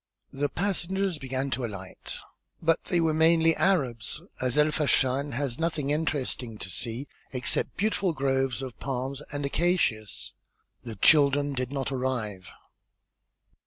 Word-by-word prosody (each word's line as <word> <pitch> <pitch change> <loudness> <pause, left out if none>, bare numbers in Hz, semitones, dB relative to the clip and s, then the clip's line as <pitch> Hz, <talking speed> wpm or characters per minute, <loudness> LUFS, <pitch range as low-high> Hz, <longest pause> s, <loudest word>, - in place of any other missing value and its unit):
The 145 +1 -1
passengers 190 -2 -1
began 135 +1 -2
to 130 - -1
alight, 100 -5 -6 0.4
but 165 0 +1
they 175 - +2
were 160 -1 +2
mainly 165 +1 +4
Arabs, 135 - +1 0.2
as 125 +1 +1
El 150 +1 +5
Fachn 140 -2 +2
has 130 0 -2
nothing 155 -4 0
interesting 140 -7 -2
to 95 - -5
see 120 +7 -2 0.2
except 125 -2 0
beautiful 200 -3 +1
groves 135 -3 0
of 130 -3 -7
palms 135 +1 -3
and 145 0 -2
acacias. 140 - 0 0.5
The 115 -2 -6
children 145 +4 +4
did 125 -1 -2
not 140 -1 -2
arrive. 120 -8 -2
140 Hz, 130 wpm, -28 LUFS, 125-160 Hz, 0.5 s, El